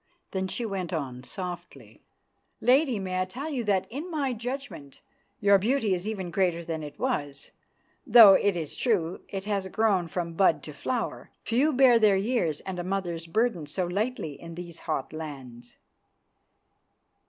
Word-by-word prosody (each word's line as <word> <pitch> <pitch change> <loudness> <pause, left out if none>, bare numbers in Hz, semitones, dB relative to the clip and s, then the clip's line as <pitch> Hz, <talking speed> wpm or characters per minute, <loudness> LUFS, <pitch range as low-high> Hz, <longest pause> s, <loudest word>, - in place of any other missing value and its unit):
Then 190 0 -2
she 235 +5 -3
went 190 -5 -3
on 135 -7 -4
softly, 175 - -8 0.6
"Lady, 260 0 +3
may 185 -2 -2
I - - +1
tell 270 +12 -6
you 255 -5 -2
that, 195 -2 +2
in 295 +8 -5
my 285 -6 -1
judgment, 230 - -6 0.4
your 200 -1 +5
beauty 225 -1 +1
is 180 +2 -3
even 190 -5 -4
greater 175 -3 0
than 160 -1 -3
it 150 -1 -8
was, 145 - -3 0.6
though 225 -4 +10
it 200 0 +3
is 160 -4 -4
true 185 -8 0
it 195 -1 -5
has 200 -2 -1
grown 195 -3 +1
from 170 0 -4
bud 165 -4 +3
to 150 - -8
flower. 235 - -3
Few 265 +7 +2
bear 255 -3 +6
their 210 -3 +5
years 195 - 0
and 185 -2 -5
a - - -2
mother's 175 -3 -3
burdens 175 -6 0
so 185 - 0
lightly 200 - -3
in 170 0 -9
these 175 -1 -8
hot 135 - -2
lands." 130 -6 -8
190 Hz, 165 wpm, -27 LUFS, 165-225 Hz, 0.6 s, though